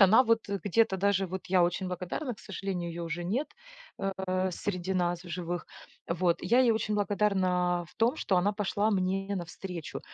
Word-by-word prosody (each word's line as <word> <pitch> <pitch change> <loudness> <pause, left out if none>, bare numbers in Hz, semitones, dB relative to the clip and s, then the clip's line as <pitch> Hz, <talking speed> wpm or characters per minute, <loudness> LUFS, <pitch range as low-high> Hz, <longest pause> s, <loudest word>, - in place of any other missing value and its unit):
она 205 +5 +8
вот 230 -3 +1
где-то 200 +2 +2
даже 195 0 +2
вот 185 +1 -6
я 180 -1 +4
очень 180 +2 -1
благодарна, 185 - -3
к - - -24
сожалению, 190 -3 -4
её 170 +1 -5
уже 170 +1 -3
нет, 240 - -1 0.5
э, 190 -1 -1
среди 185 0 -2
нас 175 -1 0
в - - -10
живых. 175 0 -3 0.4
Вот, 170 0 +2
я 235 +8 +4
ей 250 -2 +5
очень 220 -1 0
благодарна 185 -4 +1
в - - -21
том, 230 +3 +3
что 190 - +1
она 190 +4 +3
пошла 210 +1 0
мне 195 +1 0
навстречу. 175 -2 -6
190 Hz, 180 wpm, -30 LUFS, 175-205 Hz, 0.5 s, она